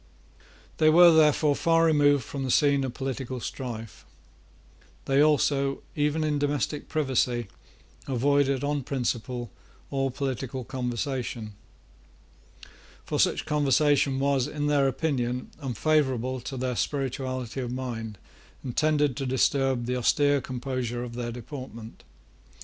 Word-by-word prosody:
They 155 Hz, -, +5 dB
were, 170 Hz, +2 st, +8 dB
therefore, 150 Hz, -2 st, +4 dB
far 165 Hz, +1 st, +3 dB
removed 145 Hz, -4 st, +4 dB
from 135 Hz, +5 st, -5 dB
the 130 Hz, -, -3 dB
scene 140 Hz, +1 st, +3 dB
of 130 Hz, -2 st, -4 dB
political 130 Hz, -1 st, -4 dB
strife. 115 Hz, -3 st, -6 dB, 1.0 s
They 135 Hz, +1 st, +3 dB
also, 140 Hz, -2 st, +2 dB
even 150 Hz, +1 st, +1 dB
in 150 Hz, -1 st, 0 dB
domestic 145 Hz, +1 st, -2 dB
privacy, 125 Hz, -6 st, 0 dB, 0.6 s
avoided 140 Hz, +1 st, +1 dB
on 145 Hz, 0 st, 0 dB
principle 125 Hz, -2 st, -3 dB, 0.4 s
all 135 Hz, -1 st, 0 dB
political 130 Hz, -1 st, -4 dB
conversation. 125 Hz, -3 st, -4 dB, 1.5 s
For -, -, -2 dB
such -, -, +2 dB
conversation 145 Hz, -2 st, +2 dB
was, 135 Hz, -2 st, +1 dB
in 145 Hz, -1 st, -3 dB
their 145 Hz, -2 st, +3 dB
opinion, 125 Hz, -4 st, -2 dB
unfavourable 130 Hz, -1 st, 0 dB
to 135 Hz, -, -5 dB
their 125 Hz, 0 st, -2 dB
spirituality 130 Hz, -2 st, -3 dB
of 120 Hz, -1 st, -4 dB
mind, 115 Hz, -4 st, -5 dB, 0.5 s
and 125 Hz, -3 st, -5 dB
tended 150 Hz, -3 st, +2 dB
to 135 Hz, -2 st, -2 dB
disturb 130 Hz, -1 st, +1 dB
the 125 Hz, +1 st, -1 dB
austere 145 Hz, +3 st, +3 dB
composure 125 Hz, -1 st, -4 dB
of 120 Hz, -1 st, -7 dB
their 120 Hz, 0 st, -4 dB
deportment. 120 Hz, -2 st, -9 dB
135 Hz, 120 wpm, -27 LUFS, 125-145 Hz, 1.5 s, were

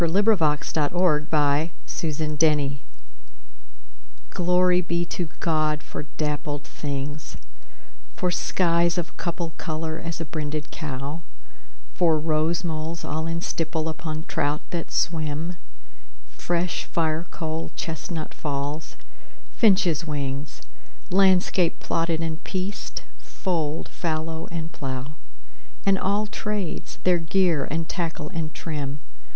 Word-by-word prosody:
Gerard 175 Hz, +5 st, +4 dB
Manley 220 Hz, -4 st, +6 dB
Hopkins 150 Hz, +1 st, +2 dB
Pied 155 Hz, 0 st, +1 dB
Beauty 145 Hz, -3 st, +4 dB, 1.5 s
GLORY 180 Hz, 0 st, +4 dB
be 170 Hz, 0 st, 0 dB
to 170 Hz, -1 st, -3 dB
God 155 Hz, -2 st, +2 dB
for -, -, -5 dB, 0.2 s
dappled 150 Hz, -1 st, -1 dB
things, 145 Hz, 0 st, -4 dB, 0.8 s
For 180 Hz, -1 st, +1 dB
skies 170 Hz, -1 st, +3 dB
of 170 Hz, -1 st, -2 dB
couple 170 Hz, -1 st, -2 dB
color 160 Hz, -1 st, -2 dB
as 165 Hz, -1 st, -3 dB
a 165 Hz, -, -2 dB
brinded 150 Hz, -1 st, -3 dB
cow, 145 Hz, +1 st, -4 dB, 0.7 s
For 165 Hz, -3 st, +4 dB
rose 155 Hz, +2 st, +1 dB
moles 160 Hz, 0 st, -2 dB
all 160 Hz, +2 st, -1 dB
in 165 Hz, 0 st, -1 dB
stipple 160 Hz, -1 st, -1 dB
upon 155 Hz, -1 st, -3 dB
trout 145 Hz, 0 st, 0 dB
that 170 Hz, -2 st, -3 dB
swim; 160 Hz, +1 st, 0 dB, 0.7 s
Fresh 175 Hz, -, -1 dB
firecoal 160 Hz, 0 st, -1 dB
chestnut 160 Hz, 0 st, -4 dB
falls, 145 Hz, +1 st, -3 dB, 0.6 s
finches' 185 Hz, -7 st, +4 dB
wings; 140 Hz, -1 st, -3 dB, 0.5 s
Landscape 185 Hz, -2 st, +4 dB
plotted 165 Hz, -1 st, +1 dB
and 160 Hz, -1 st, -2 dB
pieced, 190 Hz, +2 st, -3 dB, 0.2 s
fold, 160 Hz, -4 st, -2 dB
fallow 160 Hz, -1 st, -2 dB
and 165 Hz, -1 st, -3 dB
plough, 130 Hz, 0 st, -4 dB, 0.7 s
And 195 Hz, -1 st, +5 dB
all 200 Hz, +3 st, +2 dB
trades, 210 Hz, -3 st, -3 dB
their 180 Hz, -1 st, +5 dB
gear 165 Hz, -3 st, +3 dB
and 160 Hz, +2 st, -1 dB
tackle 165 Hz, -4 st, -2 dB
and 160 Hz, -2 st, -3 dB
trim. 145 Hz, -3 st, -3 dB
160 Hz, 110 wpm, -26 LUFS, 150-175 Hz, 1.5 s, Manley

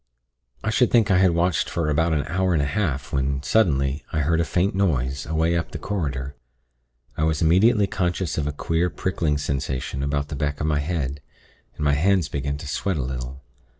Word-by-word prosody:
"I 110 Hz, -, 0 dB
should 120 Hz, +1 st, +3 dB
think 115 Hz, -4 st, +3 dB
I 90 Hz, -, +5 dB
had 95 Hz, -1 st, +5 dB
watched 85 Hz, +1 st, +1 dB
for 85 Hz, -3 st, -1 dB
about 80 Hz, +3 st, +2 dB
an 75 Hz, -3 st, +1 dB
hour 95 Hz, +2 st, 0 dB
and 80 Hz, -, +2 dB
a -, -, 0 dB
half, 75 Hz, -3 st, -2 dB
when, 70 Hz, 0 st, 0 dB
suddenly, 70 Hz, -10 st, +2 dB
I 75 Hz, -, 0 dB
heard 80 Hz, +3 st, +1 dB
a -, -, +2 dB
faint 90 Hz, +4 st, 0 dB
noise, 70 Hz, -9 st, 0 dB
away 80 Hz, +2 st, +1 dB
up 85 Hz, -, -1 dB
the -, -, -6 dB
corridor. 70 Hz, -8 st, -3 dB, 0.8 s
I 75 Hz, -, -1 dB
was 80 Hz, 0 st, +1 dB
immediately 100 Hz, +6 st, +4 dB
conscious 90 Hz, -4 st, -1 dB
of 75 Hz, -2 st, -1 dB
a -, -, -1 dB
queer 85 Hz, +4 st, 0 dB
prickling 80 Hz, -6 st, -1 dB
sensation 70 Hz, -1 st, -3 dB
about 70 Hz, +1 st, -1 dB
the 75 Hz, -, -4 dB
back 70 Hz, +1 st, -2 dB
of 75 Hz, -, -1 dB
my 75 Hz, -2 st, +1 dB
head, 75 Hz, -3 st, -2 dB, 0.5 s
and 75 Hz, -, -3 dB
my 70 Hz, -, +4 dB
hands 90 Hz, +3 st, +2 dB
began 70 Hz, 0 st, -2 dB
to 75 Hz, -, -8 dB
sweat 90 Hz, +4 st, -1 dB
a 70 Hz, -, -1 dB
little. 65 Hz, +1 st, -5 dB
75 Hz, 205 wpm, -23 LUFS, 70-90 Hz, 0.8 s, I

